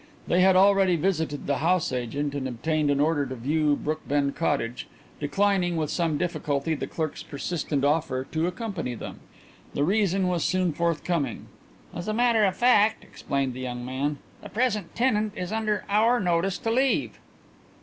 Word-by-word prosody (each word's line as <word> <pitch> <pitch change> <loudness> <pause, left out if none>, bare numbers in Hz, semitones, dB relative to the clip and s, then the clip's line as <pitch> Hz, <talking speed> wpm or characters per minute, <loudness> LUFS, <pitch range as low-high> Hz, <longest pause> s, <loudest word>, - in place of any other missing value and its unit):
They 180 - +2
had 190 0 +5
already 195 -1 +5
visited 160 -4 -1
the 140 -1 0
house 175 +1 +1
agent 130 +4 -2
and 140 -2 -3
obtained 150 +5 -1
an 140 -1 +2
order 150 0 +2
to 130 - -5
view 145 +4 +1
Brookbend 145 -2 -1
Cottage, 135 -7 -1 0.3
declining, 185 +3 +1
with 155 -2 -1
some 165 -4 0
difficulty, 155 -3 -1
the 155 - -3
clerk's 160 -2 -4
persistent 145 -1 -2
offer 145 -3 +1
to 160 +2 0
accompany 180 - -4
them. - - -8 0.6
The 145 - +1
reason 195 +1 +2
was 175 -3 0
soon 185 -2 +1
forthcoming. 170 -1 -1 0.5
"As 175 +3 -6
a 215 - -1
matter 235 -2 +3
of 190 -1 0
fact," 220 -3 +4
explained 135 -2 -3
the 125 - -8
young 125 -1 -5
man, 140 +3 -2 0.2
"the - - -9
present 215 -6 -1
tenant 215 -4 +1
is 180 +1 -4
under 215 -2 -1
our 225 +4 +3
notice 180 0 +1
to 225 - -2
leave." 260 +3 +1
165 Hz, 165 wpm, -26 LUFS, 145-195 Hz, 0.6 s, had